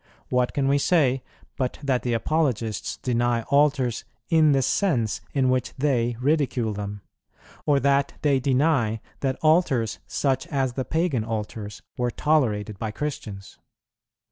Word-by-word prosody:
What 125 -1 +1
can 140 -1 +1
we 140 +1 +3
say, 135 -5 +2 0.4
but 130 -2 -2
that 130 -3 +1
the 120 - -1
Apologists 115 -4 -1
deny 120 -1 0
altars 140 -4 +2 0.3
in 160 -2 +5
the 135 -2 +3
sense 125 - +1
in 135 -2 +1
which 130 -1 0
they 120 -4 +1
ridicule 130 -5 +1
them; 100 0 -5 0.7
or, 145 -2 +4
that 140 0 +2
they 140 -3 +3
deny 130 -4 +2 0.2
that 135 -1 -1
altars 155 -8 +2
such 135 -2 0
as 135 -4 -1
the 130 0 -3
Pagan 160 -8 0
altars 110 -1 -5 0.2
were 125 0 +1
tolerated 110 -9 0
by 110 - -2
Christians? 105 -7 -6
130 Hz, 140 wpm, -25 LUFS, 115-145 Hz, 0.7 s, in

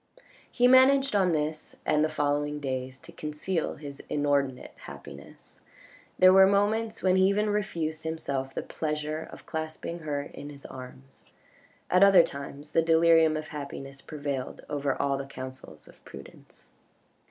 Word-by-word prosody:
He 245 0 +4
managed 265 0 +5
on 190 -3 +3
this 155 0 -2
and 150 - +2
the 155 - +1
following 145 -1 -1
days 130 -2 -4
to - - -13
conceal 155 +3 -3
his 140 -1 -9
inordinate 140 -3 0
happiness. 70 0 -12 0.6
There 185 0 +7
were 190 0 +8
moments 210 +3 +1
when 185 0 +4
he 190 0 +5
even 210 +2 +1
refused 165 -7 -2
himself 140 -4 -3
the - - -3
pleasure 155 0 -4
of - - -12
clasping 160 +1 -5
her 145 -3 -3
in 145 0 -10
his 140 -1 -12
arms. 70 - -11 0.7
At 180 - +4
other 195 -3 +8
times 140 +1 -8
the 165 - +3
delirium 165 -1 +4
of 155 0 -6
happiness 135 -2 -7
prevailed 145 -4 -5
over 145 -2 -2
all 140 -1 0
the 135 - -6
counsels 130 - -9
of - - -18
prudence. - - -14
150 Hz, 150 wpm, -28 LUFS, 140-175 Hz, 0.7 s, were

